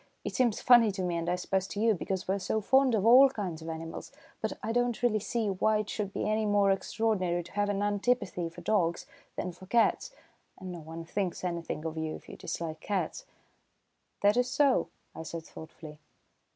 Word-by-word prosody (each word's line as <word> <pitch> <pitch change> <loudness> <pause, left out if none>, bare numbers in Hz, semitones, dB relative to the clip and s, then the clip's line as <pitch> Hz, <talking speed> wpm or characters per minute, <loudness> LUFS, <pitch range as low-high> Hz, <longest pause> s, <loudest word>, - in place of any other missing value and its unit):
It - - -4
seems 240 -4 +1
funny 240 -4 +6
to 190 -1 -3
me, 175 -1 -1
and 170 0 -2
I 180 - +2
suppose 190 +1 -1
to 205 - -6
you, 225 +1 +4
because 190 0 -3
we're 195 +2 0
so 195 +3 -1
fond 265 +3 +3
of 205 -1 0
all 260 +4 +8
kinds 190 -10 -5
of 160 - -7
animals; 165 0 -6 0.3
but - - -1
I 225 - -1
don't 245 0 0
really 220 -3 +3
see 225 +1 -2
why 210 +3 +2
it 210 -1 -3
should 205 -2 -3
be - - -2
any 215 0 +1
more 205 -1 +4
extraordinary 195 -3 0
to 175 - -14
have 205 0 0
an 205 0 0
antipathy 205 -4 0
for 170 +1 -12
dogs 170 -3 +1 0.3
than 180 - -3
for 180 +2 -14
cats, 235 +3 +2 0.5
and 185 -1 -7
no 175 - -7
one 165 +1 -8
thinks 185 +1 -3
anything 170 -3 -3
of 160 0 -3
it 160 0 -3
if - - -13
you - - -9
dislike 160 -2 -5
cats." 205 - -3 0.9
"That 205 +3 +4
is 250 0 +2
so," 280 -3 +2 0.2
I - - -7
said 165 0 -6
thoughtfully. 155 -1 -11
195 Hz, 205 wpm, -30 LUFS, 170-220 Hz, 0.9 s, all